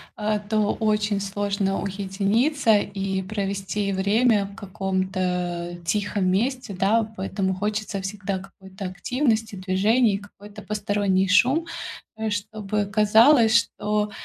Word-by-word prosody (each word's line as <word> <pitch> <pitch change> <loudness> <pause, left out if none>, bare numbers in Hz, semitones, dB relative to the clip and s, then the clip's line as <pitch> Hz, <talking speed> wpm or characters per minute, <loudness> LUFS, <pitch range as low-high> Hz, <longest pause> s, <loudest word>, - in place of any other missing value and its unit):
э, 215 0 -1
то 215 -2 +2
очень 210 -2 0
сложно 200 0 -1
уединиться 205 +6 +1
и 195 -1 -2
провести 200 0 -2
время 205 +2 +2
в 200 0 -11
каком-то 185 -3 -2
тихом 200 +2 0
месте, 240 +4 0
да, 220 +3 +2
поэтому 190 0 -1
хочется 210 0 -2
всегда 195 0 -3
какой-то 190 +1 -10
активности, 225 +3 -1
движений, 200 +4 +2
какой-то 205 +1 -13
посторонний 205 -2 0
шум, 255 - +4 0.5
э, 220 0 -2
чтобы 210 0 -2
казалось, 220 +4 +5
что 210 -2 -1
205 Hz, 110 wpm, -24 LUFS, 195-215 Hz, 0.5 s, казалось